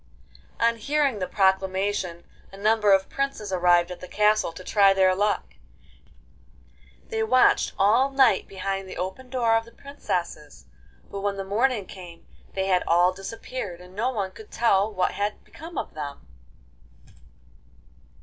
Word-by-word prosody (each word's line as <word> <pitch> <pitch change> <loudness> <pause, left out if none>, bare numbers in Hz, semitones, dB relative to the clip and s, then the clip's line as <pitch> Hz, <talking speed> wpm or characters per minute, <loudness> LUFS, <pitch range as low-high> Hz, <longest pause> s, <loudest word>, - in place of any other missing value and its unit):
On 230 0 +2
hearing 275 0 0
the 185 - -2
proclamation 190 -2 0 0.3
a 195 - -12
number 210 0 +3
of 195 0 +4
princes 275 -8 -3
arrived 175 -1 +3
at 180 - -7
the 180 - -9
castle 210 -1 +2
to 175 +3 -11
try 195 0 +4
their 190 -1 +4
luck. 205 +2 -1 1.6
They 445 -1 -2
watched 255 -13 +3
all 230 +7 +4
night 270 -7 +3
behind 195 0 -4
the - - -8
open 190 +8 -5
door 240 -3 +2
of 225 - +1
the 230 - -16
princesses, 170 - -5 0.5
but 200 - -5
when 200 0 -1
the 195 - -3
morning 215 +2 0
came 175 -3 -12 0.3
they 190 0 0
had 185 -2 +2
all 175 +2 +4
disappeared, 195 0 -7
and 180 +1 -14
no 230 +5 0
one 200 -7 -3
could 215 +3 -13
tell 215 -2 +2
what 185 -3 0
had 205 +1 -3
become 325 0 -11
of - - -4
them. 145 - -7
195 Hz, 150 wpm, -25 LUFS, 185-225 Hz, 1.6 s, of